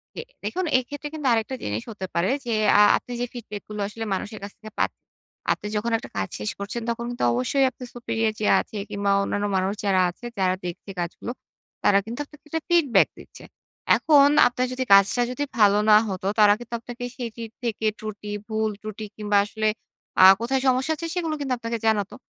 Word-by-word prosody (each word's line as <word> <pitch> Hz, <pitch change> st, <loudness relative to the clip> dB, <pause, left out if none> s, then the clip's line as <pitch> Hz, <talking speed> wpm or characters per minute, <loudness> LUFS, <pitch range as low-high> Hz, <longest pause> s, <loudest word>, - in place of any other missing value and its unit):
জ্বি, -, -, -4 dB, 0.2 s
দেখুন 370 Hz, +1 st, -2 dB
এইক্ষেত্রে 285 Hz, +4 st, -5 dB
কিন্তু 300 Hz, -3 st, -3 dB
আরেকটা 225 Hz, +3 st, -1 dB
জিনিস 105 Hz, +2 st, -3 dB
হতে 200 Hz, -3 st, -6 dB
পারে 170 Hz, +3 st, +2 dB, 0.2 s
যে, 235 Hz, -, -1 dB, 0.3 s
আ -, -, +8 dB, 0.2 s
আপনি 245 Hz, -, -11 dB
যে 245 Hz, -, 0 dB
feedback 215 Hz, -4 st, -7 dB
গুলো 210 Hz, -1 st, -5 dB
আসলে 225 Hz, +2 st, -6 dB
মানুষের 205 Hz, +3 st, -4 dB
কাছ 200 Hz, -, -6 dB
থেকে 215 Hz, -1 st, -11 dB
পাত -, -, +2 dB, 0.6 s
আপনি 210 Hz, -, -2 dB
যখন 220 Hz, +3 st, -1 dB
একটা -, -, -10 dB
কাজ 95 Hz, -1 st, -1 dB
শেষ 105 Hz, -, -2 dB
করছেন, 200 Hz, +4 st, -4 dB
তখন 235 Hz, 0 st, -2 dB
কিন্তু 245 Hz, -, -4 dB
অবশ্যই 265 Hz, -, +2 dB
আপনার 250 Hz, -, -12 dB
Superior 225 Hz, -2 st, -1 dB
যে 210 Hz, -, +1 dB
আছে 215 Hz, -, -6 dB
কিংবা 200 Hz, 0 st, 0 dB
অন্যান্য 205 Hz, +1 st, -1 dB
মানুষ 190 Hz, +2 st, 0 dB
যারা 190 Hz, -2 st, +3 dB
আছে, 180 Hz, -, -11 dB
যারা 185 Hz, -1 st, +2 dB
দেখছে 175 Hz, +3 st, -7 dB
কাজগুলো, 175 Hz, +7 st, -4 dB, 0.5 s
তারা 200 Hz, -, +5 dB
কিন্তু 235 Hz, +5 st, -6 dB
আপনাকে 300 Hz, +1 st, -19 dB
একটা 325 Hz, +1 st, -2 dB
feedback 330 Hz, -8 st, +4 dB
দিচ্ছে। -, -, -13 dB, 0.5 s
এখন 285 Hz, -3 st, +6 dB, 0.2 s
আপনার 250 Hz, +1 st, -1 dB
যদি 260 Hz, 0 st, -1 dB
কাজটা 200 Hz, +5 st, +6 dB
যদি 255 Hz, +3 st, -2 dB, 0.2 s
ভালো 205 Hz, 0 st, +6 dB
না 210 Hz, -, +9 dB
হতো, 190 Hz, 0 st, -3 dB
তারা 205 Hz, -1 st, +7 dB
কিন্তু 240 Hz, -1 st, -10 dB
আপনাকে 245 Hz, +1 st, -9 dB
সেটির 230 Hz, -2 st, -6 dB
থেকে 225 Hz, -2 st, -2 dB
ত্রুটি, 210 Hz, -1 st, -7 dB, 0.2 s
ভুল, 220 Hz, 0 st, 0 dB
ত্রুটি 215 Hz, 0 st, -6 dB
কিংবা 210 Hz, -1 st, +1 dB
আসলে 215 Hz, +1 st, -2 dB, 0.6 s
আ -, -, +11 dB, 0.2 s
কোথায় 260 Hz, +3 st, 0 dB
সমস্যা 260 Hz, +4 st, +2 dB
হচ্ছে, 330 Hz, +2 st, -5 dB
সেগুলো 330 Hz, -3 st, -1 dB
কিন্তু 275 Hz, -3 st, -1 dB
আপনাকে 230 Hz, 0 st, -3 dB
জানাতো। 205 Hz, -3 st, +1 dB
220 Hz, 195 wpm, -24 LUFS, 205-250 Hz, 0.6 s, আ